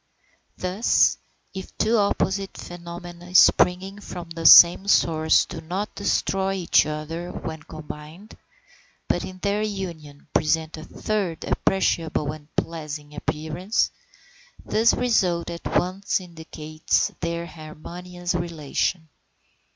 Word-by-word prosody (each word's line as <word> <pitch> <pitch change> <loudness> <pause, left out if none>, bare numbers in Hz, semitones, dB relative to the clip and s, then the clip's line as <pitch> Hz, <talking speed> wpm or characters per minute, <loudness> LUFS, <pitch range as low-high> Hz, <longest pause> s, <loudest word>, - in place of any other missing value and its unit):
Thus, 185 +5 +2 0.3
if 190 -1 -8
two 225 +2 +2
opposite 200 -1 0
phenomena 175 +1 -9
springing 190 +2 +4
from 175 -4 -8
the 165 -1 +1
same 175 +3 +9
source 160 -5 +4
do - - -8
not 185 +6 -4
destroy 195 -1 0
each 180 -5 +3
other 160 +3 -5
when 160 -1 -6
combined, 155 +6 -10 0.7
but - - 0
in 185 - -8
their 205 +1 +1
union 170 -9 -6
present 160 +1 +1
a 155 - -9
third 195 -3 -3
appreciable 165 -6 0
and 150 -1 -11
pleasing 150 -2 -4
appearance, 160 +7 -1 0.7
this 225 +2 +3
result 180 -9 +1
at 170 - -6
once 190 +3 0
indicates 160 -3 -2
their 170 0 -3
harmonious 175 +3 -7
relation. 170 0 -2
170 Hz, 110 wpm, -24 LUFS, 160-190 Hz, 0.7 s, same